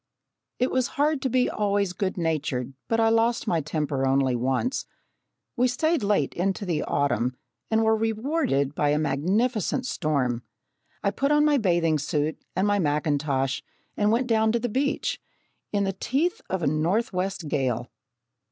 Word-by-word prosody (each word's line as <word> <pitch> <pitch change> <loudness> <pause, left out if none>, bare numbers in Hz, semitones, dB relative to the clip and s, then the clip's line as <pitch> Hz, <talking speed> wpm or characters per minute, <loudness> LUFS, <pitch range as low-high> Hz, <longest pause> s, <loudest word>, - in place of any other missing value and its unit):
It 250 - +1
was 255 -1 +1
hard 295 0 +2
to 265 - 0
be 250 +1 +2
always 200 -2 0
good 190 0 -2
natured, 150 -6 -1
but 225 - +1
I 225 0 +4
lost 230 +1 +2
my 170 -8 +1
temper 145 -3 -1
only 135 -1 +2
once. 130 - -1 0.7
We 250 0 +3
stayed 315 +5 +1
late 205 0 +1
into 195 +3 -1
the 170 -4 0
autumn 130 -3 0 0.3
and 220 0 +2
were 220 0 +4
rewarded 220 - 0
by 150 -1 +1
a 150 - +2
magnificent 200 - 0
storm. 140 - 0 0.6
I 200 - +2
put 275 +7 0
on 295 0 +4
my 295 -1 +4
bathing 170 -6 +2
suit 150 +2 -1
and 185 +2 +2
my 205 0 +2
mackintosh 145 -4 0 0.3
and 205 0 +2
went 240 +3 +2
down 220 -2 +2
to 235 - +2
the 245 +1 -2
beach, 280 +6 -1 0.5
in 205 -1 +1
the 195 0 -1
teeth 285 - -1
of 190 -2 -2
a - - +2
northwest 180 +3 0
gale. 125 -5 -1
195 Hz, 160 wpm, -26 LUFS, 150-235 Hz, 0.7 s, I